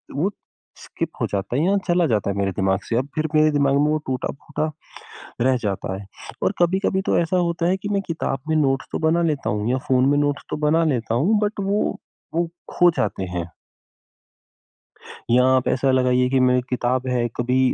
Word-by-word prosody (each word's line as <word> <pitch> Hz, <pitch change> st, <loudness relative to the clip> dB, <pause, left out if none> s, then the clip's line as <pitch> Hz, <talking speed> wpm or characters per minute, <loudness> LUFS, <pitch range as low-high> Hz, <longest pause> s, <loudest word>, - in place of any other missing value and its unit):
वो 180 Hz, +8 st, 0 dB, 0.5 s
स्किप -, -, -5 dB
हो -, -, +2 dB
जाता 100 Hz, +4 st, -2 dB
है 150 Hz, -, +2 dB
या 200 Hz, +2 st, +3 dB
चला 175 Hz, -1 st, +3 dB
जाता 105 Hz, -4 st, 0 dB
है 100 Hz, -, -2 dB
मेरे 100 Hz, -1 st, 0 dB
दिमाग 95 Hz, +1 st, 0 dB
से 115 Hz, -, -3 dB
अब 130 Hz, +3 st, -1 dB
फिर 155 Hz, 0 st, 0 dB
मेरे 155 Hz, 0 st, +5 dB
दिमाग 140 Hz, -1 st, +2 dB
में -, -, +3 dB
वो 155 Hz, -, +2 dB
टूटा-फूटा 140 Hz, +4 st, -3 dB, 0.8 s
रह 130 Hz, +1 st, +3 dB
जाता 95 Hz, -2 st, -2 dB
है। 100 Hz, 0 st, -9 dB, 0.4 s
और -, -, +2 dB
कभी-कभी 190 Hz, +2 st, +2 dB
तो -, -, +2 dB
ऐसा 170 Hz, +2 st, +1 dB
होता 170 Hz, -1 st, 0 dB
है 190 Hz, -, +2 dB
कि 205 Hz, +2 st, -6 dB
मैं 200 Hz, -1 st, +1 dB
किताब 155 Hz, -5 st, -2 dB
में 155 Hz, -, +2 dB
नोट्स 135 Hz, -3 st, +1 dB
तो -, -, -1 dB
बना 170 Hz, +1 st, +2 dB
लेता 140 Hz, -, -3 dB
हूँ 105 Hz, +2 st, -1 dB
या 130 Hz, -, +1 dB
फ़ोन 130 Hz, 0 st, +3 dB
में 145 Hz, 0 st, +3 dB
नोट्स 145 Hz, -1 st, 0 dB
तो -, -, -1 dB
बना 165 Hz, +2 st, +3 dB
लेता 115 Hz, -1 st, -2 dB
हूँ 190 Hz, -, +2 dB
बट 210 Hz, 0 st, -1 dB
वो 200 Hz, +2 st, +1 dB, 0.5 s
वो 170 Hz, 0 st, +1 dB, 0.3 s
खो 175 Hz, -1 st, +5 dB
जाते 105 Hz, -6 st, -1 dB
हैं। 85 Hz, -1 st, -3 dB, 1.8 s
यां 125 Hz, +1 st, +5 dB
आप 130 Hz, -, +1 dB
ऐसा 135 Hz, +1 st, +1 dB
लगाइए 125 Hz, -1 st, +2 dB
कि 135 Hz, -1 st, +2 dB
मेरी 125 Hz, 0 st, +3 dB
किताब 125 Hz, +1 st, -1 dB
है 120 Hz, -1 st, +1 dB
कभी 125 Hz, +2 st, +1 dB
135 Hz, 205 wpm, -22 LUFS, 125-170 Hz, 1.8 s, मेरे